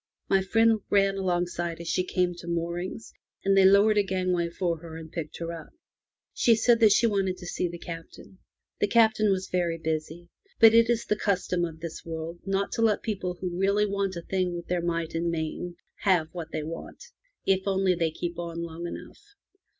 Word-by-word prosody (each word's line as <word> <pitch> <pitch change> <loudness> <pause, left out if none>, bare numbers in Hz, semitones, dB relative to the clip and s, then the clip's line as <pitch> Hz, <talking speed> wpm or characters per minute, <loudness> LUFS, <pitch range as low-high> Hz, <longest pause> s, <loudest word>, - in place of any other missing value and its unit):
My 195 -1 +3
friend 225 +3 +3
ran 195 -1 +3
alongside 175 -2 -1
as 170 - -7
she 185 - +1
came 180 -1 0
to 170 - -10
moorings, 170 +5 -3 0.3
and 195 0 +4
they 195 -1 +6
lowered 205 +2 +6
a - - +6
gang 185 -1 -1
way 170 -1 0
for 170 -1 -1
her 160 -1 -9
and 160 -1 -10
picked 165 -3 -5
her 170 0 -4
up. 165 -2 -8 0.6
She 230 - +4
said 230 +1 +4
that 220 -3 +6
she 235 - +4
wanted 195 -4 +1
to 180 - -10
see 175 0 -2
the 170 0 -7
Captain. 170 +3 -10 0.4
The 205 - +2
Captain 220 -1 +4
was 190 -1 0
very 175 -2 0
busy, 160 +1 -4 0.3
but 225 -1 +8
it 230 0 +5
is 235 0 +1
the 210 - +1
custom 185 -4 0
of 160 -1 -8
this 170 -1 -6
world 165 +1 -6 0.3
to - - -2
let 220 -2 +4
the - - -20
people 185 -5 -2
who 180 -1 -3
really 200 +2 +3
want 200 -2 -1
a 170 - -6
thing 185 -1 -1
with 170 0 -6
their 180 -1 0
might 170 -1 -2
and 170 +1 0
main 170 +2 -3 0.2
have 175 -5 +2
what 165 -2 -7
they 155 -1 -3
want, 165 - -8 0.4
if 190 0 +1
only 190 -1 +2
they 165 -2 0
keep 170 +2 -5
on 170 -1 -4
long 170 +1 -6
enough. - - -9
180 Hz, 205 wpm, -27 LUFS, 170-195 Hz, 0.6 s, but